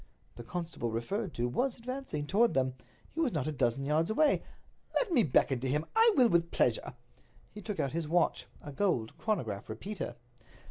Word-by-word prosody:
The -, -, -8 dB
constable 165 Hz, -3 st, -4 dB
referred 170 Hz, -, -2 dB
to 120 Hz, +1 st, 0 dB
was 245 Hz, -, 0 dB
advancing 255 Hz, -, -4 dB
toward 220 Hz, +9 st, +3 dB
them—he 130 Hz, -, -4 dB
was 300 Hz, -8 st, +1 dB
not 150 Hz, -5 st, -1 dB
a 155 Hz, -, -1 dB
dozen 135 Hz, -2 st, 0 dB
yards 155 Hz, +4 st, +1 dB
away. 290 Hz, +7 st, +3 dB, 0.5 s
"Let 425 Hz, -8 st, +1 dB
me 255 Hz, -, +6 dB
beckon 135 Hz, -, +2 dB
to 130 Hz, +1 st, -2 dB
him—I 440 Hz, -, +3 dB
will 250 Hz, -2 st, +7 dB
with 170 Hz, -4 st, +2 dB
pleasure." 125 Hz, -2 st, 0 dB, 0.6 s
He 210 Hz, -, -9 dB
took 205 Hz, 0 st, -5 dB
out 135 Hz, -, 0 dB
his 165 Hz, -1 st, -2 dB
watch—a 165 Hz, -2 st, -1 dB
gold 135 Hz, -, 0 dB
chronograph 115 Hz, -, -2 dB
repeater. 140 Hz, -, -5 dB
160 Hz, 170 wpm, -31 LUFS, -, 0.6 s, will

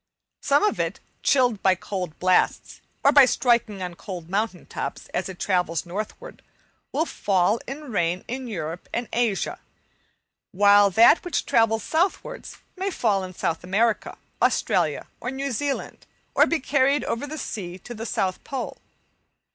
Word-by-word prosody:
Some 285 Hz, +1 st, +3 dB
of 420 Hz, -, +1 dB
it, -, -, -1 dB, 0.2 s
chilled 245 Hz, -6 st, +3 dB
by 190 Hz, -1 st, +4 dB
cold 180 Hz, -3 st, -5 dB
blasts, 185 Hz, 0 st, +1 dB, 0.2 s
or 280 Hz, -, +6 dB
by 280 Hz, -2 st, +8 dB
striking 235 Hz, -6 st, +1 dB
on 180 Hz, -1 st, -4 dB
cold 175 Hz, -1 st, -8 dB
mountain 205 Hz, -2 st, -1 dB
tops, -, -, -6 dB
as -, -, -2 dB
it 185 Hz, -, -8 dB
travels 180 Hz, -3 st, 0 dB
northwards, 215 Hz, -, -6 dB, 0.5 s
will 320 Hz, -, +1 dB
fall 200 Hz, -, +1 dB
in 275 Hz, +1 st, -7 dB
rain 175 Hz, -2 st, 0 dB
in 255 Hz, +1 st, -4 dB
Europe 170 Hz, -5 st, -5 dB
and 235 Hz, 0 st, -2 dB
Asia, 230 Hz, -5 st, 0 dB, 0.9 s
while 205 Hz, +1 st, +6 dB
that 225 Hz, -, +6 dB
which 355 Hz, -, -2 dB
travels 225 Hz, -1 st, +2 dB
southwards 375 Hz, +9 st, -2 dB, 0.2 s
may 385 Hz, +1 st, -2 dB
fall 210 Hz, -, +1 dB
in 185 Hz, -1 st, -8 dB
South 165 Hz, 0 st, -2 dB
America, 210 Hz, +5 st, 0 dB, 0.2 s
Australia, -, -, +1 dB
or -, -, -4 dB
New 270 Hz, +1 st, -3 dB
Zealand, 275 Hz, +4 st, -3 dB, 0.3 s
or -, -, +5 dB
be 335 Hz, -, +1 dB
carried 275 Hz, +1 st, +2 dB
over 260 Hz, +5 st, -3 dB
the 310 Hz, +2 st, -6 dB
sea 185 Hz, -, -5 dB
to 240 Hz, +6 st, -9 dB
the 225 Hz, 0 st, -6 dB
South 185 Hz, -3 st, -1 dB
Pole. 265 Hz, -4 st, -5 dB
220 Hz, 155 wpm, -24 LUFS, 185-270 Hz, 0.9 s, by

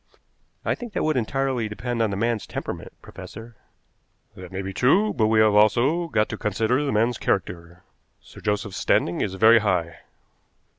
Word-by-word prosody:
"I -, -, +1 dB
think 240 Hz, -4 st, -8 dB
that -, -, -1 dB
would 155 Hz, -1 st, +1 dB
entirely 130 Hz, -1 st, -1 dB
depend 115 Hz, +3 st, -3 dB
on 110 Hz, -, +2 dB
the 100 Hz, -, -3 dB
man's 115 Hz, 0 st, -1 dB
temperament, -, -, -6 dB
professor." 115 Hz, 0 st, -11 dB, 0.8 s
"That 90 Hz, -1 st, -11 dB
may 95 Hz, +1 st, -4 dB
be 95 Hz, 0 st, -5 dB
true, 190 Hz, -, +3 dB
but 110 Hz, -, +1 dB
we 110 Hz, 0 st, +3 dB
have 110 Hz, -1 st, +4 dB
also 125 Hz, +11 st, +3 dB
got 110 Hz, -8 st, +1 dB
to -, -, -6 dB
consider 110 Hz, +6 st, 0 dB
the 140 Hz, -, -1 dB
man's 115 Hz, +2 st, +1 dB
character. 85 Hz, -1 st, -3 dB, 0.4 s
Sir -, -, -15 dB
Joseph's 105 Hz, -1 st, -2 dB
standing 85 Hz, -, +1 dB
is 95 Hz, -2 st, -2 dB
very 110 Hz, +3 st, +6 dB
high." 90 Hz, -6 st, -1 dB
110 Hz, 170 wpm, -24 LUFS, 100-125 Hz, 0.8 s, very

